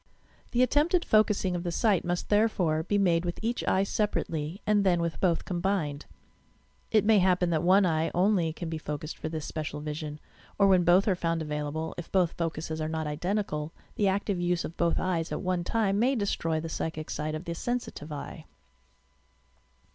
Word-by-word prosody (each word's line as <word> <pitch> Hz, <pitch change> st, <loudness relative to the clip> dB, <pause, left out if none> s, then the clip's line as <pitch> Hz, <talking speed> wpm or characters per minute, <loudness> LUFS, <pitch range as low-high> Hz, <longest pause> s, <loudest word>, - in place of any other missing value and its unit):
The 245 Hz, +1 st, +3 dB
attempted 315 Hz, +7 st, +2 dB
focusing 210 Hz, -4 st, +3 dB
of 175 Hz, -, -2 dB
the 175 Hz, -1 st, -3 dB
sight 205 Hz, 0 st, +2 dB
must, 175 Hz, 0 st, -2 dB
therefore, 200 Hz, -7 st, +2 dB
be 205 Hz, +5 st, 0 dB
made 175 Hz, -4 st, +3 dB
with 175 Hz, -1 st, -3 dB
each 235 Hz, +2 st, -1 dB
eye 190 Hz, -, +3 dB
separately 175 Hz, -5 st, -2 dB
and 210 Hz, -1 st, +3 dB
then 180 Hz, -3 st, +3 dB
with 170 Hz, -1 st, -2 dB
both 175 Hz, -3 st, +1 dB
combined. 175 Hz, -5 st, -2 dB, 0.8 s
It 215 Hz, -2 st, +3 dB
may 215 Hz, -1 st, +5 dB
happ>en 180 Hz, -1 st, +2 dB
that 160 Hz, -2 st, +1 dB
one 190 Hz, +3 st, +5 dB
eye 160 Hz, -2 st, +1 dB
only 180 Hz, -3 st, +2 dB
can 165 Hz, +2 st, -6 dB
be 160 Hz, -1 st, -4 dB
focused 150 Hz, 0 st, -5 dB
for 155 Hz, -, -5 dB
this 155 Hz, -1 st, -4 dB
special 155 Hz, -2 st, -4 dB
vision, 150 Hz, 0 st, -5 dB, 0.4 s
or 200 Hz, -, +5 dB
when 185 Hz, -2 st, +5 dB
both 175 Hz, +4 st, +4 dB
are 200 Hz, -, +4 dB
found 165 Hz, -2 st, -1 dB
available, 150 Hz, +1 st, -3 dB
if 175 Hz, -, -8 dB
both 180 Hz, -3 st, +3 dB
focuses 160 Hz, -1 st, -3 dB
are 155 Hz, -, -2 dB
not 160 Hz, 0 st, -2 dB
identical, 155 Hz, 0 st, -2 dB, 0.2 s
the 205 Hz, -, +1 dB
active 195 Hz, -1 st, 0 dB
use 175 Hz, 0 st, 0 dB
of 165 Hz, -, -7 dB
both 170 Hz, -1 st, +1 dB
eyes 175 Hz, -3 st, -1 dB
at -, -, -2 dB
one 180 Hz, -2 st, -1 dB
time 200 Hz, +1 st, +1 dB
may 260 Hz, +4 st, +3 dB
destroy 165 Hz, -7 st, -1 dB
the 165 Hz, -, -5 dB
psychic 160 Hz, -1 st, -4 dB
sight 155 Hz, +1 st, -2 dB
of 155 Hz, +3 st, -6 dB
the 170 Hz, -, -3 dB
sensitive 235 Hz, -6 st, -4 dB
e\ 145 Hz, -, -6 dB
e. -, -, -14 dB
175 Hz, 195 wpm, -28 LUFS, 160-200 Hz, 0.8 s, may